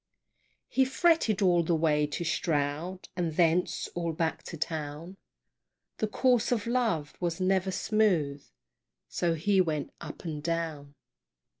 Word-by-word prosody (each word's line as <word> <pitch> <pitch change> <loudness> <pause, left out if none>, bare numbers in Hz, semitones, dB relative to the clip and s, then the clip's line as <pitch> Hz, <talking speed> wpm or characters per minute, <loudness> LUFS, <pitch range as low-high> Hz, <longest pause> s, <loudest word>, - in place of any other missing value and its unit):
He 265 - +3
fretted 265 - +2
all 175 -2 +4
the 170 0 +1
way 150 -2 +2
to 150 +4 -4
Stroud, 160 +3 -1
And 170 -3 -2
thence 170 +1 +2
all 170 -1 -2
back 160 0 -1
to 165 - -7
town, 155 +3 -4 0.8
The 215 - 0
course 245 +2 +2
of 225 -4 0
love 230 -12 0
was 170 -1 -2
never 190 0 +2
smooth, 180 -9 +1 0.7
So 170 -1 0
his 190 +4 +3
went 155 -5 -2
up 155 -2 -8
and 155 -3 -4
down. 155 -3 -3
170 Hz, 135 wpm, -29 LUFS, 155-195 Hz, 0.8 s, all